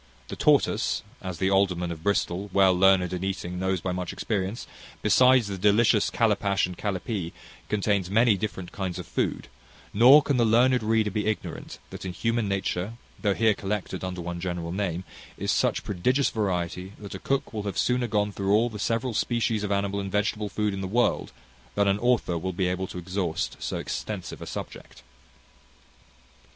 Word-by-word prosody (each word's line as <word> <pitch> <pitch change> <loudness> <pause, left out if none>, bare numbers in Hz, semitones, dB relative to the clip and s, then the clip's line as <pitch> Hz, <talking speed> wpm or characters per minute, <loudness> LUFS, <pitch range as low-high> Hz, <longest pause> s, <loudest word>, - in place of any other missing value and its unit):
The - - -5
tortoise - - +2 0.2
as 90 -2 -5
the 95 +3 +1
alderman 90 -3 +2
of 80 -2 -7
Bristol, 100 +1 0
well 95 -1 +5
learned 95 -1 +4
in 90 0 -3
eating, 90 -2 -3
knows 95 -1 0
by 95 - -2
much 90 0 -3
experience 100 +1 -3 0.4
besides 130 -2 +5
the 100 -2 -5
delicious 105 +2 +4
calipash 100 -4 +1
and 90 0 -7
calipee, 95 -2 -3 0.4
contains 100 -3 0
many 110 +1 +4
different 95 -2 -5
kinds 95 -3 -4
of - - -6
food; - - -2 0.5
nor 130 +8 +8
can 140 -3 +1
the 120 - +4
learned 120 +3 +4
reader 110 -1 +1
be 105 +2 -1
ignorant, 110 - -4
that - - -8
in 95 -1 -4
human 115 +3 0
nature, 95 +1 -2 0.3
though 100 -3 +1
here 110 -1 +3
collected 95 -2 -4
under 90 -1 -4
one 85 0 -5
general 85 -2 -3
name, 95 -2 -2 0.3
is - - -1
such - - +1
prodigious 125 +9 +1
variety, 90 -2 -2
that 100 -2 -9
a - - -6
cook 135 -2 -1
will 110 - -2
have 100 -2 -4
sooner 125 -1 +1
gone 105 -1 0
through 100 0 -2
all 115 +2 +2
the 105 - -7
several 115 +3 -1
species 110 -1 0
of 105 - -2
animal 100 0 0
and 100 -1 -4
vegetable 105 +1 0
food 105 +1 -1
in 95 - -4
the 95 - -3
world, 120 +5 +1 0.4
than 100 - +2
an 100 +1 +2
author 120 -8 +1
will 95 +3 -3
be 90 +1 0
able 90 +1 -2
to - - -8
exhaust 90 -1 -2
so - - -3
extensive - - -5
a - - -7
subject. - - -8
100 Hz, 185 wpm, -26 LUFS, 95-110 Hz, 0.5 s, nor